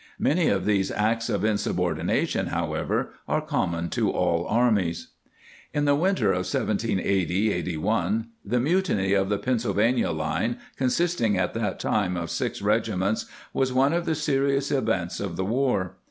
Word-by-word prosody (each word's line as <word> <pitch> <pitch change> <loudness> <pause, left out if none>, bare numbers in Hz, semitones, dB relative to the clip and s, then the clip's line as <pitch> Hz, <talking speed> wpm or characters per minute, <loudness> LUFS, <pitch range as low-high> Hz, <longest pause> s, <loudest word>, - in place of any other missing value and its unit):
* - - -27
Many 165 +2 +2
of 95 -2 +1
these 100 -2 +2
acts 115 +2 0
of 105 -1 0
insubordination, 90 -6 0
however, - - -2
are - - +1
common 85 0 -1
to 110 -4 +1
all 85 -1 0
armies. 105 -8 +1 0.7
In 145 0 +1
the 145 - +4
winter 155 - +2
of 90 0 -1
1780 100 -2 0
81, 95 +5 -1
the 120 +5 0
mutiny 135 - +1
of 95 -1 +2
the 105 - +1
Pennsylvania 115 0 +1
line, 80 -2 -1 0.2
consisting 130 - +1
at 95 - 0
that 115 -2 -2
time 95 -4 0
of 85 -1 -4
six - - -2
regiments, 105 -1 0 0.3
was 130 -1 +1
one 135 +4 +3
of 170 0 0
the 160 - +1
serious 140 -2 +1
events 95 -11 0
of 95 -4 -4
the 95 - -2
war. 115 -5 0
105 Hz, 155 wpm, -25 LUFS, 95-130 Hz, 0.7 s, the